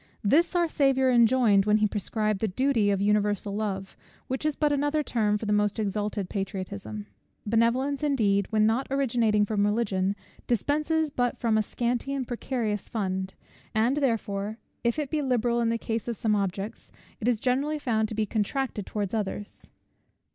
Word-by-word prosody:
This 320 - +3
our 345 -1 +3
Saviour 270 -4 +2
enjoined 235 -4 +4
when 210 0 +5
he 210 0 +3
prescribed 215 0 -1
the 220 - 0
duty 230 0 +1
of 200 -1 +1
universal 205 -1 +1
love, 195 -3 -3 0.3
which 265 +4 -2
is 305 - -1
but 300 -1 +1
another 290 +2 +1
term 210 -6 +1
for 220 - -6
the 210 - +1
most 210 0 +1
exalted 210 -1 -2
patriotism. 185 - -5 0.4
Benevolence, 235 +6 +1
indeed, 210 -10 +2
when 215 -1 +3
not 230 +5 +1
originating 230 -6 +2
from 205 -1 0
Religion, 205 -2 +1 0.3
dispenses 300 +6 +1
but 245 -3 0
from 230 -2 +1
a 220 - +4
scanty 245 +5 -2
and 260 -3 -3
precarious 235 -4 -2
fund; 190 -3 -2 0.4
and 235 +6 +2
therefore, 215 -6 -1 0.3
if 235 +2 +1
it 295 -3 -3
be 310 - 0
liberal 240 -3 +1
in 230 - +2
the 230 - +1
case 225 -1 -3
of 235 -2 -3
some 215 -2 +1
objects, 195 +1 -3 0.3
it 230 - -2
is 240 -3 +2
generally 275 +6 0
found 225 -6 0
to 220 - -5
be 215 0 +1
contracted 220 +1 -2
towards 205 -2 -3
others. 205 -1 -4
220 Hz, 170 wpm, -27 LUFS, 205-260 Hz, 0.4 s, when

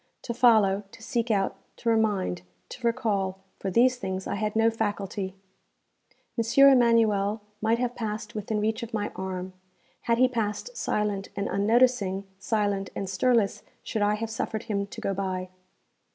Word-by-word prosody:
To 235 - -3
follow, 220 -5 +4
to 230 -1 -13
seek 235 +1 -1
out, 195 -3 +1 0.2
to - - -7
remind, 210 - +1 0.3
to 240 -2 -3
recall 200 -5 -1 0.2
for 195 - -2
these 250 +6 +4
things 190 -4 -4
I - - -2
had 215 +1 -2
no 225 +1 +4
faculty. 205 -3 -3 1.0
M. 235 +5 +6
Emanuel 225 -5 +3 0.2
might 225 +1 +2
have 245 0 -1
passed 215 -1 -4
within 215 0 -2
reach 220 +3 0
of 230 -1 -5
my 210 -1 -2
arm. 185 0 -4 0.6
Had 230 - +4
he 255 +1 +5
passed 230 - -3
silent 205 - -1
and 200 - -2
unnoticing, 205 -2 +2 0.2
silent 205 -1 0
and 195 - -3
stirless 220 +1 +2 0.2
should 220 - -3
I 205 +1 +3
have 225 +1 -4
suffered 220 0 -3
him 200 -2 -2
to - - -9
go 195 - -1
by. 185 -1 -3
215 Hz, 160 wpm, -27 LUFS, 195-230 Hz, 1.0 s, M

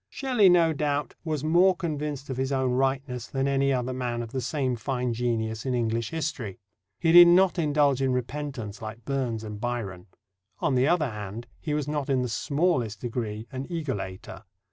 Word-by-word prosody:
Shelley, 250 -8 +3
no 170 -2 +5
doubt, 145 -1 -1
was 155 -4 -2
more 175 +4 +4
convinced 150 -5 -4
of 130 - -4
his 130 +1 -1
own 130 -2 +1
rightness 130 -2 -1
than 135 0 -1
any 140 0 +2
other 130 -1 -1
man 120 -2 -2
of 115 - -9
the 130 - -2
same 130 0 -1
fine 125 0 -2
genius 110 -2 -1
in 130 -2 -1
English 115 -1 -1
history. 140 - -4 0.4
He 165 - +3
did 175 +1 +10
not 180 0 +5
indulge 145 -4 +2
in 135 -1 +2
repentance, 125 -4 -4
like 110 +1 -8
Burns 125 -5 -2
and 105 -1 -7
Byron. 110 -7 -4 0.5
On - - 0
the 130 +1 +3
other 155 -6 +2
hand, 105 +2 -6
he 150 -2 -2
was 150 -2 -2
not 145 -2 -2
in 130 -2 +2
the 125 - -2
smallest 130 - 0
degree 110 -3 -4
an 130 +1 -5
egolator. 130 - -5
130 Hz, 185 wpm, -27 LUFS, 120-150 Hz, 0.5 s, did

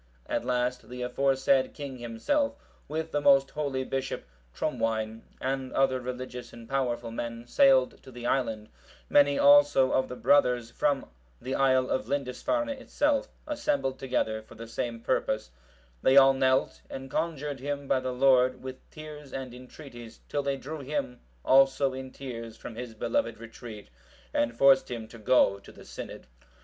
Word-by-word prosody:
At - - -2
last 125 0 -1
the 125 0 -5
aforesaid 135 +1 +2
king 140 -4 -7
himself, 280 - 0 0.3
with 160 +1 -3
the 145 - 0
most 135 -1 +5
holy 140 -3 -2
Bishop 135 0 -3 0.3
Trumwine,(751) 110 - -1 0.2
and 130 0 -2
other 135 -1 +2
religious 125 0 -6
and 115 -1 -12
powerful 120 -3 -1
men, 115 0 -5
sailed 130 +1 +4
to - - -14
the 120 -1 -9
island; 115 -4 -1 0.4
many 145 0 +5
also 145 -2 +6
of 130 - +1
the 125 - -5
brothers 125 -10 +3
from 145 -2 0 0.3
the 130 - -4
isle 130 -1 +3
of - - -1
Lindisfarne 145 - -1
itself, 280 +1 0 0.2
assembled 290 - -1
together 110 -4 -1
for 110 - -16
the 115 +1 -8
same 115 0 -4
purpose: 110 - -1 0.5
they 130 +1 +5
all 135 0 +8
knelt, 130 0 +1
and 135 0 -7
conjured 150 -3 -2
him 140 +1 -4
by 130 - +2
the 130 0 -3
Lord, 130 0 +3
with 130 0 -6
tears 150 -2 -10
and 130 -2 -6
entreaties, 125 -2 -11
till 145 - -1
they 140 -1 -1
drew 150 +4 -7
him, 135 -3 -3 0.3
also 135 0 +4
in 130 0 -6
tears, 115 -4 -8
from - - -8
his 115 0 -7
beloved 285 - -1
retreat, 115 - -10 0.4
and 115 0 0
forced 135 0 +5
him 115 -3 -5
to 115 - -12
go 105 -3 +3
to - - -14
the - - -15
synod. - - -8
130 Hz, 160 wpm, -28 LUFS, 120-140 Hz, 0.5 s, all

